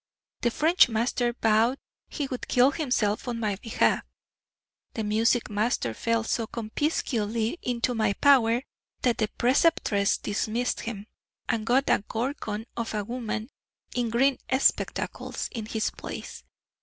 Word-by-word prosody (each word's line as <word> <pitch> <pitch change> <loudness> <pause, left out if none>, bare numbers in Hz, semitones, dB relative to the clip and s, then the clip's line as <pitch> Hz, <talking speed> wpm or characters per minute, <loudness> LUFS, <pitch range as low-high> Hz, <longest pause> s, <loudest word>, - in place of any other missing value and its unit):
The 240 - +3
French 320 +5 +4
master 240 +1 0
vowed 225 +4 +4 0.3
he 290 - -3
would 255 -2 -5
kill 250 +2 +4
himself 250 -8 0
on 235 -1 -2
my 210 -3 -1
behalf; 225 +2 +1 0.9
the 220 - -2
music 225 +3 +2
master 205 - 0
fell 230 - 0
so 225 0 -1
conspicuously 230 +1 -1
into 245 0 -1
my 215 -3 +1
power 245 -1 +4 0.4
that 245 -2 +2
the 215 - +2
preceptress 240 -6 +3
dismissed 225 +4 -1
him, 210 -3 -5 0.4
and 225 -1 -1
got 265 +3 +3
a - - +3
gorgon 225 -3 -3
of 230 -2 -3
a 210 - -1
woman 235 +1 -4 0.4
in 240 -2 0
green 265 +4 +2 0.2
spectacles 275 - 0
in 225 -5 -5
his 220 -1 -1
place. - - -8
230 Hz, 135 wpm, -27 LUFS, 215-250 Hz, 0.9 s, French